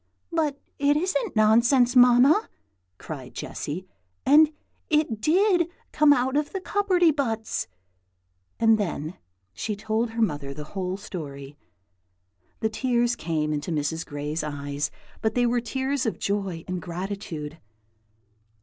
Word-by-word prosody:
"But 305 -4 0 0.2
it 285 +1 +3
isn't 380 - -1
nonsense, 235 +4 +4
Mamma!" 250 - +6 0.5
cried 130 -1 -8
Jessy, 170 +6 -5 0.4
"and 300 +2 +7 0.4
it 300 -8 +1
did 355 - +3 0.2
come 300 -1 +5
out 260 -1 +2
of 295 0 0
the 385 - -2
cupperty 370 -4 +3
buts!" 225 - -2 0.9
And 225 -1 +5
then 170 -4 -3 0.3
she 210 - -3
told 220 +3 -1
her 230 +1 -3
mother 145 -7 -2
the 150 - -6
whole 185 -1 -2
story. 145 -8 -8 1.1
The 220 - +1
tears 240 +1 +1
came 155 -6 -1
into 150 +4 -3
Mrs. 160 0 -1
Gray's 145 +2 -4
eyes, 145 0 -3 0.3
but 220 0 0
they 245 -1 +3
were 240 0 +1
tears 265 +2 -1
of 220 - -2
joy 195 -5 -2
and 180 -1 -3
gratitude. 170 -4 -5
220 Hz, 130 wpm, -25 LUFS, -, 1.1 s, and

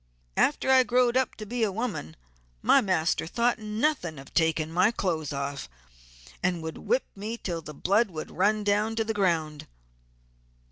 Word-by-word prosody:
After 280 -2 +2
I 260 -1 +7
growed 250 -1 +2
up 260 -1 +1
to 215 - -8
be 240 +3 -4
a 215 -3 +2
woman 205 - -4 0.5
my 275 - +6
master 175 -6 0
thought 235 +6 +1
nothing 215 - -1
of 135 0 -12
taking 160 -1 +1
my 180 +5 +4
clothes 165 - -2
off, 140 - -4 0.7
and 175 -2 0
would 160 0 -6
whip - - 0
me 210 +3 -5
until 175 -7 -4
the 150 -1 -10
blood 205 +8 +2
would 155 -3 -7
run 210 +4 +1
down 210 +2 +1
to 225 - +1
the 220 0 -2
ground. 165 -7 0
200 Hz, 170 wpm, -27 LUFS, 160-230 Hz, 0.7 s, I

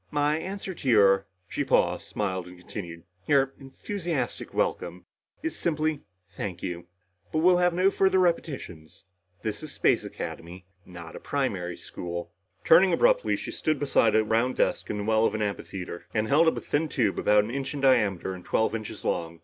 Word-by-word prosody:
"My 150 +1 +1
answer 190 +2 -5
to 140 -6 -4
your 100 -3 +5
" 90 -1 -45
she - - -2
paused, - - +2
smiled 95 -3 -3
and 90 0 -12
continued, 85 -2 -8 0.2
"your 135 -2 +3
enthusiastic 170 +6 -4
welcome - - -2 0.4
is 325 - -2
simply 155 -2 -1 0.3
thank 90 -4 -6
you. 85 -1 -5 0.4
But 155 0 0
we'll 180 0 +6
have 180 0 +3
no 185 +2 +4
further 190 -1 +3
repetitions. 140 - -2 0.4
This 110 -2 -3
is 155 -2 -7
Space - - +2
Academy 90 +2 -7 0.2
not 85 -2 -10
a - - -7
primary 95 -11 -2
school!" 85 -1 -6 0.3
Turning 180 +3 +7
abruptly, - - +3
she - - -6
stood 155 -1 0
beside 130 -5 +3
a 110 - +5
round 115 +4 +1
desk - - 0
in 105 - -2
the 105 - -3
well 110 +1 +3
of - - -3
an 110 - -1
amphitheater, 95 -3 -5
and 110 0 +1
held 155 +7 +4
up 160 - +2
a - - -3
thin 155 +2 -1
tube 125 - 0
about 105 0 +4
an 110 - -5
inch 135 +1 -3
in 140 - -4
diameter 105 -9 +2
and 90 -1 -9
twelve 110 - +1
inches 110 -2 -6
long. 85 0 -2
115 Hz, 185 wpm, -27 LUFS, 95-155 Hz, 0.4 s, Turning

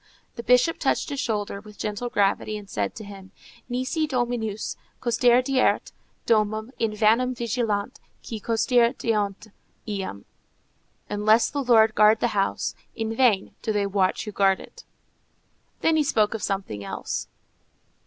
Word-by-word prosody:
The - - -5
Bishop 250 +7 +3
touched - - 0
his 280 - -3
shoulder, 205 -4 -2
with 210 0 -14
gentle 210 +3 -3
gravity, 205 0 +1
and 205 -1 -10
said 100 - -3
to - - -8
him, 195 -2 -11 0.4
_"Nisi 260 +6 -1
Dominus 240 -5 -2 0.2
custodierit 250 +2 +2 0.3
domum, 215 +1 +1
in 225 -2 0
vanum 230 +4 +3
vigilant 230 -1 -2 0.3
qui 225 -3 -5
custodiunt 225 -3 +1 0.4
eam," 195 - -5 0.8
Unless 215 +2 +3
the 285 - -2
Lord 225 -3 +5
guard 215 +1 +5
the 240 - +1
house, 195 -2 -1 0.2
in 225 -1 -3
vain 225 -6 +2
do 220 - -1
they 205 -1 +1
watch 195 -1 0
who 210 - -5
guard 195 -1 +3
it._ 475 - -13 1.0
Then 325 -1 +3
he 305 - +3
spoke 215 -7 +2
of 225 - -4
something 190 - -3
else. - - -4
220 Hz, 140 wpm, -25 LUFS, 205-245 Hz, 1.0 s, Lord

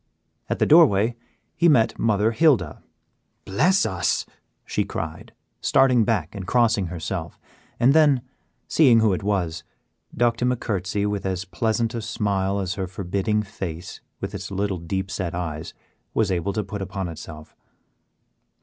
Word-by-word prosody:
At - - 0
the - - +2
doorway 120 - +5 0.4
he 170 -1 +4
met 115 -7 +3
Mother 110 0 +2
Hilda. 115 - +2 0.6
"Bless 180 - +2
us," 90 -2 0 0.4
she - - -1
cried, - - -6 0.3
starting 125 -4 +4
back 95 -8 -1
and 95 -3 -7
crossing 115 -5 +2
herself, 85 -1 -5 0.4
and 125 +3 +5
then, 145 -5 +4 0.4
seeing 125 -8 +5
who 110 -3 +3
it 90 - -2
was, 90 -5 -1 0.5
ducked 120 0 +2
him 125 +1 +2
a 125 - -1
courtesy 100 -1 -2
with 105 -1 -2
as 95 0 -2
pleasant 115 +2 -1
a 115 - -3
smile 100 -3 -1
as 95 -1 -2
her 95 -2 -3
forbidding 100 +3 -1
face, 90 -3 -7 0.2
with - - -5
its - - -6
little 100 -1 -2
deep 95 +4 -3
set 85 -3 -3
eyes, 80 -3 -5 0.4
was 110 -3 +2
able 95 +2 -1
to 105 - -1
put 100 +1 -6
upon 95 0 -4
itself. 80 -1 -10
100 Hz, 150 wpm, -23 LUFS, 95-115 Hz, 0.6 s, doorway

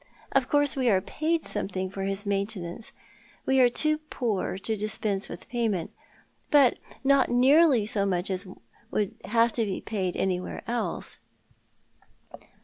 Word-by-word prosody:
Of 270 -2 +1
course 290 -1 +3
we 255 -3 +2
are 195 -4 +4
paid 315 - -1
something 190 -1 -2
for 195 - -6
his 195 +1 -2
maintenance 200 -1 -3 0.3
— 230 0 -29
we 265 0 +3
are 250 -1 +6
too 305 +5 +1
poor 235 -11 -2
to 220 +3 -2
dispense 210 -1 -1
with - - -9
payment— 225 -8 -1 0.6
but 280 -5 +5 0.2
not 275 0 +4
nearly 260 0 +5
so 200 -2 +2
much 180 0 0
as 190 +1 -2 0.4
would 205 -2 -1
have 230 +1 +2
to 230 - +1
be 200 -3 -2
paid 190 -5 -3
anywhere 185 -1 -2
else." 235 +1 -3
220 Hz, 145 wpm, -27 LUFS, 195-260 Hz, 0.6 s, are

